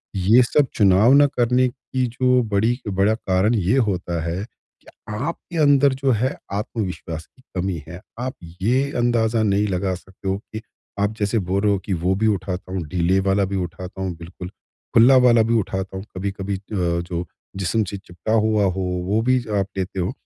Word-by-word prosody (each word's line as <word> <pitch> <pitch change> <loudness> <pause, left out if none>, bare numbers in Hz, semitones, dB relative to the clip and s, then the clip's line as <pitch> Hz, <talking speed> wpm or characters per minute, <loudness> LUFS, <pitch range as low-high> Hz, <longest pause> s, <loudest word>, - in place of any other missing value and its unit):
ये 100 +6 +5
सब 140 +3 +2
चुनाव 100 +4 +5
ना 145 +1 +7
करने 125 -1 +2
की 130 0 -3
जो 125 +1 +2
बड़ी 115 +5 +2
बड़ा 100 +2 +2
कारण 100 +2 +1
ये 100 +5 +2
होता 90 -3 -2
है 85 +4 -3
कि - - -31 0.3
आपके 165 +7 -5
अंदर 140 -2 +5
जो 135 - +4
है 125 +4 0 0.2
आत्मविश्वास 95 -6 -4
की 130 - -27
कमी 90 -3 -2
है। 85 +3 -9 0.2
आप 130 +1 -3 0.3
ये 130 +7 +1
अंदाज़ा 115 -2 +2
नहीं 105 0 +2
लगा 95 -1 -1
सकते 95 +2 -11
हो 95 - 0 0.2
कि 110 - -4 0.4
आप 100 +1 +1
जैसे 105 +2 +1
बोल 95 +1 -1
रहे 105 0 +3
हो 100 - +1
कि 100 - -1
वो 90 +3 0
भी 110 +3 +1
उठाता 95 -2 -2
हूँ 95 -2 -2
ढीले 90 +3 +1
वाला 95 +1 +2
भी 100 +1 -4
उठाता 90 +1 -5
हूँ 95 -3 -3
बिल्कुल, 90 +2 -9 0.4
खुल्ला 125 +3 +7
वाला 120 -2 +5
भी 115 +1 +1
उठाता 95 -1 -4
हूँ 95 - -7
कभी-कभी 100 0 -3
अ, - - -6
जो 85 -2 -1 0.3
जिस्म 95 +4 0
से 100 0 -5
चिपका 95 +2 -5
हुआ 110 -1 +3
हो 95 - -3 0.3
वो 105 +3 +2
भी 130 - +5 0.2
आप 95 - +1
ज - - 0
लेते 95 +1 -3
हो। 90 +3 -1
100 Hz, 195 wpm, -22 LUFS, 95-115 Hz, 0.4 s, ना